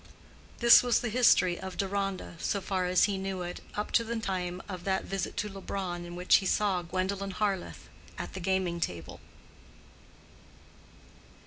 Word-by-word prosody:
This 235 -1 +8
was 245 -1 +2
the 240 - -2
history 210 -6 +4
of 190 -1 -7
Deronda, 195 -1 -2
so 200 - -1
far 185 -1 -1
as 180 0 +3
he 200 -2 +1
knew 190 -1 -3
it, 175 0 -6
up 210 - -3
to 230 - +4
the 230 +1 -4
time 185 -4 -2
of 185 -3 -6
that 190 0 0
visit 195 -1 -3
to 210 - -1
Leubronn 190 -3 -5
in 175 0 -8
which 180 +1 +5
he 190 - -2
saw 195 -3 +1
Gwendolen 190 +3 -2
Harleth 195 -1 -2 0.3
at - - -6
the 190 - -5
gaming 185 -1 0
table. 85 - -4
190 Hz, 160 wpm, -30 LUFS, 180-200 Hz, 0.3 s, This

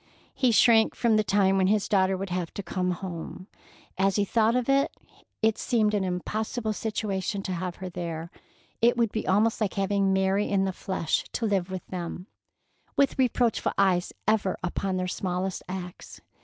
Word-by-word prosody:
He 255 - +2
shrank 225 0 +5
from 230 -2 +2
the 215 - +3
time 195 -1 +3
when 190 -1 +3
his 210 0 +2
daughter 190 -1 +2
would 195 0 -5
have 175 -2 -2
to 200 - -4
come 180 0 -2
home. 180 0 -5 0.5
As 195 0 +3
he 205 - +2
thought 225 +2 +2
of 250 -1 0
it, 275 +2 +3 0.5
it 220 -1 +2
seemed 220 -4 +1
an 205 -2 +1
impossible 215 +5 -2
situation 200 -2 -2
to 190 - -3
have 180 0 -3
her 190 - -7
there; 170 -2 -5 0.5
it 240 +1 +4
would 230 -3 +2
be 220 - -3
almost 215 +4 +2
like 210 - 0
having 195 0 +1
Mary 190 +2 +1
in 195 -1 +2
the 190 - -2
flesh 180 -3 -1
to 230 - -1
live 195 -4 0
with 185 -1 -5
them, 180 0 -6 0.7
with 280 -1 +2
reproachful 245 -3 +1
eyes 185 -3 +2 0.2
ever 215 -4 +2
upon 185 +1 -1
their 185 0 -1
smallest 185 0 -2
acts. 180 -1 -7
195 Hz, 180 wpm, -27 LUFS, 185-215 Hz, 0.7 s, shrank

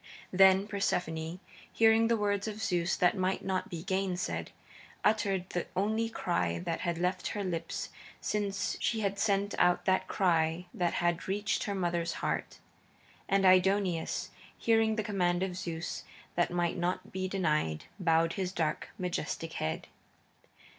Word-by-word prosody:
Then 190 +1 +6
Persephone, 175 -4 -1 0.3
hearing 225 0 +5
the 230 0 +3
words 205 0 0
of 215 0 -5
Zeus 175 -4 +1
that 180 +2 +3
might 185 0 -1
not 190 -1 -1
be 165 -2 -5
gainsaid, 190 -1 -1 0.6
uttered 195 -4 +2
the 175 - -2
only 220 +4 +1
cry 90 - -1
that 165 - -3
had 170 -1 -1
left 180 +1 0
her 205 -2 -3
lips 185 +3 -3 0.3
since 200 -2 -1
she 225 -2 0
had 200 -1 -1
sent 200 -1 +1
out 180 0 +3
that 190 0 +2
cry 165 -2 +1
that 175 -2 0
had 175 0 0
reached 200 -1 0
her 200 - -2
mother's 170 -2 0
heart. - - -2 0.7
And 195 0 +3
Aidoneus, 185 -2 +3 0.3
hearing 225 -1 +3
the 215 - -1
command 180 -4 +1
of 185 -2 -2
Zeus 170 -2 -4 0.3
that 175 - +2
might 175 +1 0
not 175 +1 -2
be 185 0 -2
denied, 150 - 0 0.2
bowed 165 -2 +3
his 185 -2 -2
dark, 160 -4 -1
majestic 165 -2 -3
head. 80 - -3
185 Hz, 145 wpm, -31 LUFS, 175-200 Hz, 0.7 s, Then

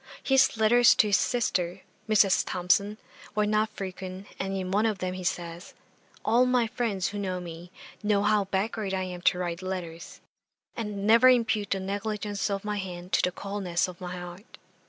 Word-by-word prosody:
His 270 -3 +3
letters 235 +2 +6
to 215 - +4
his 200 - +5
sister, 185 -6 -1 0.3
Mrs. 200 -3 +4
Thomson, 200 +4 +1 0.4
were 210 0 +2
not 215 +1 +1
frequent, 185 0 -7
and 195 0 -2
in 185 -1 -4
one 210 +3 +2
of 215 -3 -1
them 185 -1 -3
he 185 0 -6
says, 175 -1 -4 0.5
"All 240 +3 +4
my 250 -2 +3
friends 215 -5 -2
who 205 - -5
know 185 -2 -2
me, 170 0 -9 0.3
know 205 -1 +2
how 210 -1 +3
backward 195 +1 -2
I 185 - -1
am 180 -1 -6
to 180 - +3
write 175 -1 -3
letters; 180 -3 -6 0.6
and 210 -3 -4
never 230 +4 +7
impute 225 -5 +2
the 195 - 0
negligence 205 +1 -3
of 200 0 -3
my 210 0 -2
hand 180 -2 -6
to - - +4
the 180 - +1
coldness 190 -2 -2
of 180 0 -11
my 180 0 -5
heart." 180 +4 -10
195 Hz, 180 wpm, -27 LUFS, 180-215 Hz, 0.6 s, never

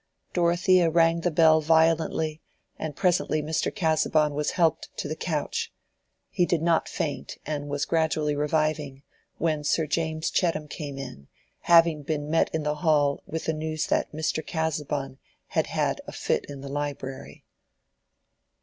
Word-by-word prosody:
Dorothea 175 0 +3
rang 165 0 +3
the 175 - +1
bell 160 -1 +5
violently, 160 0 +2 0.4
and 155 -3 -4
presently 175 -3 +1
Mr. 155 +1 -1
Casaubon 155 -4 +2
was 150 +1 -1
helped 165 -3 +2
to - - -3
the 155 - -3
couch: 155 -3 -2 0.6
he 180 - +1
did 170 -2 +1
not 165 -1 +2
faint, - - -4
and 145 -1 -3
was 145 0 -1
gradually 160 -2 +1
reviving, 150 -2 -1 0.3
when 155 -2 0
Sir 160 +2 +1
James 160 +1 -1
Chettam 165 -4 0
came 145 -2 -6
in, 125 - -8 0.3
having 165 -2 +5
been 145 0 -3
met 165 - +3
in 160 -1 -2
the 150 0 -1
hall 145 -4 +2
with 160 0 -4
the 160 - 0
news 155 0 -2
that - - 0
Mr. 155 +1 -2
Casaubon 150 -4 -3 0.3
had - - 0
"had - - -1
a - - -6
fit - - -1
in 140 -1 -9
the 140 - -7
library." 135 - -5
155 Hz, 150 wpm, -26 LUFS, 145-165 Hz, 0.6 s, bell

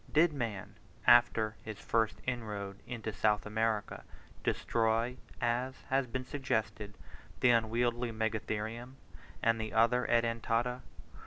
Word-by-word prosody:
Did 155 +1 +4
man, 115 -8 -4 0.3
after 110 -2 +5
his 110 -2 -6
first 110 0 0
inroad 105 -5 -4
into 110 -3 -4
South 105 +2 +2
America, 110 0 -1 0.4
destroy, 115 +2 +1 0.2
as 125 +2 0 0.2
has 135 -1 +2
been 130 +2 -4
suggested, 110 -7 -2 0.4
the 125 - +5
unwieldy 120 +1 +1
Megatherium 110 +2 -3 0.5
and 115 0 +3
the 110 - -5
other 120 +2 +3
Edentata? 115 +1 +1
115 Hz, 110 wpm, -32 LUFS, 110-125 Hz, 0.5 s, after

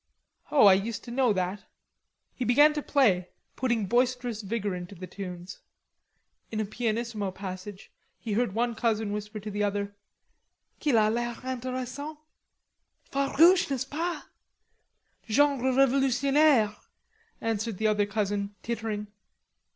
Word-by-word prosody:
"Oh, 285 -7 +5
I 195 - +9
used 205 +4 -1
to 240 - -9
know 250 -1 +2
that." 190 +1 -2 0.7
He 255 - -4
began 290 +6 +5
to 300 - -2
play, 200 -13 +2 0.3
putting 235 -5 0
boisterous 245 +1 0
vigor 205 -1 -2
into 180 +2 -7
the 185 +1 -7
tunes. 180 -1 -8 0.9
In 220 - -3
a 215 - 0
pianissimo 225 -1 -2
passage 190 +1 -8 0.3
he 220 - -4
heard 215 -2 0
one 240 +1 +1
cousin 220 -2 0
whisper 210 +1 -5
to 210 +1 -7
the 205 +1 -1
other: 205 0 -1 0.9
"Qu'il 290 -5 +1
a 215 -1 +5
l'air 240 +1 -2
interessant." 255 +4 -4 0.9
"Farouche, 320 +7 +4
n'est 270 -3 -1
ce - - -15
pas? 330 +5 -3 1.1
Genre 265 +1 +3
revolutionnaire," 270 -2 +3 0.6
answered 225 -2 -2
the 220 - -2
other 210 -1 +2
cousin, 205 -1 -2
tittering. 220 -3 -3
225 Hz, 130 wpm, -28 LUFS, 205-255 Hz, 1.1 s, I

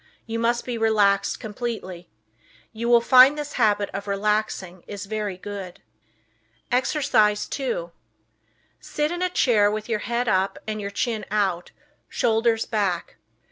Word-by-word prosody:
You 230 0 -4
must 235 +1 0
be 240 -2 -4
relaxed 210 -3 +2
completely. 210 -6 -6 0.6
You 230 +2 -3
will 235 -1 +6
find 255 +4 +7
this 295 -1 -5
habit 205 -1 +2
of 200 +1 -5
relaxing 200 -3 -1
is 205 -1 -6
very 210 -2 -3
good. 195 -2 -8 0.9
Exercise 245 -5 +2
2 235 -11 -3 0.9
Sit 300 +1 -2
in 350 +1 -4
a 365 - +1
chair 220 -11 +3
with 215 0 -4
your 220 -3 -1
head 240 +3 -2
up 195 -1 +1
and 215 -1 -4
your 200 - -4
chin 215 +1 -2
out, 195 -4 0 0.4
shoulders 225 0 +1
back. 195 -6 -2
215 Hz, 140 wpm, -24 LUFS, 200-235 Hz, 0.9 s, find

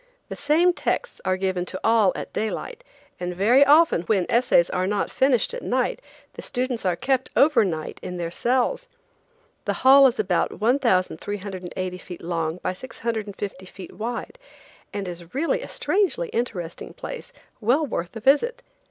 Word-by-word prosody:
The - - -5
same 315 +5 +3
texts - - -2
are 185 0 +1
given 185 -1 -1
to 185 - -5
all 225 -4 +4
at - - -6
daylight, 220 - -4 0.4
and 180 0 -4
very 235 +9 +5
often 295 - +5
when 185 0 +1
essays 235 -8 +4
are 185 0 0
not 205 0 -1
finished 265 - +2
at - - -5
night - - -1 0.3
the - - -8
students 250 -5 -2
are 180 - +2
kept 260 +4 0
over 280 -5 +5
night 160 -5 -4
in 180 - -6
their 170 -1 -3
cells. 260 - 0 0.8
The - - 0
Hall 275 +1 +9
is 245 - -1
about 185 -4 0
1,380 190 - -1
feet 180 -2 -10
long 165 -1 -2
by - - -1
650 205 -4 -5
feet 190 0 -10
wide, 235 - -5 0.5
and 200 -2 -4
is 175 +1 -9
really 320 +4 0
a - - -7
strangely 420 +5 0
interesting 185 - -4
place - - -7 0.3
well 250 +8 +2
worth 175 -10 -4
a - - -4
visit. 380 - +2
220 Hz, 160 wpm, -24 LUFS, 185-270 Hz, 0.8 s, Hall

